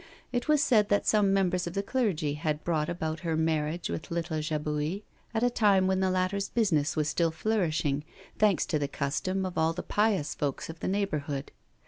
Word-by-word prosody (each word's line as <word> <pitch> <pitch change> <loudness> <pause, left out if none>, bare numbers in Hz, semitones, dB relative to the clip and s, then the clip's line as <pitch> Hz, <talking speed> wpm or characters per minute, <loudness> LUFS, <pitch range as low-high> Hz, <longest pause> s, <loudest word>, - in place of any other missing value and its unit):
It 245 +2 -2
was 305 -1 +4
said 215 -8 +3
that 205 - +2
some 205 -2 +3
members 180 -2 +1
of 170 - -5
the 200 - 0
clergy 195 - 0
had 150 0 -2
brought 155 -3 0
about 160 -2 -3
her 165 -3 -1
marriage 160 +1 0
with 160 - -5
little 170 -2 -2
Jabouille, 150 +4 -2 0.3
at 225 0 -1
a 245 - +4
time 200 -5 +4
when 190 0 +2
the 190 0 +2
latter's 185 +2 0
business 165 -11 +1
was 150 -1 +1
still 165 +1 +1
flourishing, 160 -6 0 0.4
thanks 210 -4 +3
to 155 - 0
the 145 - -1
custom 150 +8 -2
of 185 - -3
all 160 +1 +2
the 180 - -5
pious 205 -9 +1
folk 140 -2 -3
of 160 0 -8
the - - -3
neighbourhood. 150 -8 -2
175 Hz, 195 wpm, -29 LUFS, 155-200 Hz, 0.4 s, was